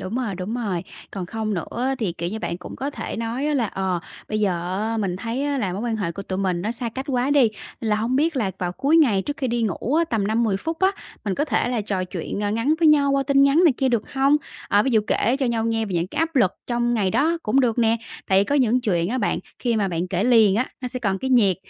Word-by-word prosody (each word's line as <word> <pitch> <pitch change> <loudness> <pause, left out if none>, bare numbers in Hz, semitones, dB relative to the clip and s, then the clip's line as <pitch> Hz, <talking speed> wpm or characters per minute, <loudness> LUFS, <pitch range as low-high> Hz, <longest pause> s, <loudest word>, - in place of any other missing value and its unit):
Đúng 185 +4 -5
rồi, 240 -6 -2
đúng 185 +5 -4
rồi. 200 -8 -2 0.3
Còn 190 -3 -5
không 215 +1 -3
nữa 195 +7 -3
á 270 - +1
thì, 210 -8 -1
kiểu 170 0 -4
như, 220 +4 -4
bạn 170 - -3
cũng - - -9
có 280 +2 -3
thể - - -5
nói 245 +7 -1
là 245 -5 +1
"Ờ, 190 -3 -2 0.3
bây 215 0 -1
giờ 180 -2 -1
á, 225 - -1
mình 195 -5 -1
thấy 230 +7 -3
á 285 -1 0
là 195 -7 -1
mối 195 +4 -4
quan 235 -2 -1
hệ 190 -6 -2
của 200 - -6
tụi 190 -1 -4
mình 185 -3 0
nó 210 - -1
xa 235 0 -3
cách 260 +4 -5
quá 255 0 +1
đi, 285 0 +5 0.4
nên 225 - -2
là 210 - +3
hông 230 +4 0
biết 310 +2 +1
là 215 -7 0
vào 180 -1 -2
cuối 280 - +2
ngày 235 -12 +4
trước 290 +5 -4
khi 280 -5 -2
đi 235 0 0
ngủ 225 - -1
á, 335 +2 +4
tầm 225 -10 -1
5-10 220 -1 +1
phút 325 +11 -4
á, 380 0 +5 0.3
mình 200 -3 -1
có 290 - 0
thể 295 - 0
là 245 -2 0
trò 195 -3 -2
chuyện, 180 +2 -5
ơ, 205 0 0
ngắn 230 +8 +1
với 330 -2 +5
nhau 285 -2 +4
qua 275 0 +2
tin 275 0 +3
nhắn 280 +6 +5
này 325 - +6
kia, 265 - +1
được 235 -4 -1
hông?" 275 +2 +4 0.3
À, 205 +1 +4
ví 265 - 0
dụ 225 -3 +4
kể 240 +4 +1
cho 265 - +2
nhau 230 -2 0
nghe 225 -1 0
về 190 - -4
những 170 0 0
cái 250 - -7
áp 325 -1 0
lực 205 -8 +4 0.2
trong 240 0 0
ngày 200 -5 +1
đó 325 - +2
cũng 255 +6 +2
được 245 -3 +1
nè. 230 -1 +3 0.3
Tại 190 0 +4
vì - - +2
có 280 - -1
những 255 -3 +3
chuyện 175 -7 0
á 255 +4 -1
bạn 205 - 0 0.2
khi 235 -3 0
mà 205 -2 +1
bạn 175 0 -2
kể 185 +2 0
liền 225 -5 +5
á, 250 - +1
nó 250 - -3
sẽ 255 - -4
còn 195 -4 0
cái 265 +4 -3
nhiệt, 205 -8 +4
225 Hz, 295 wpm, -23 LUFS, 195-265 Hz, 0.4 s, này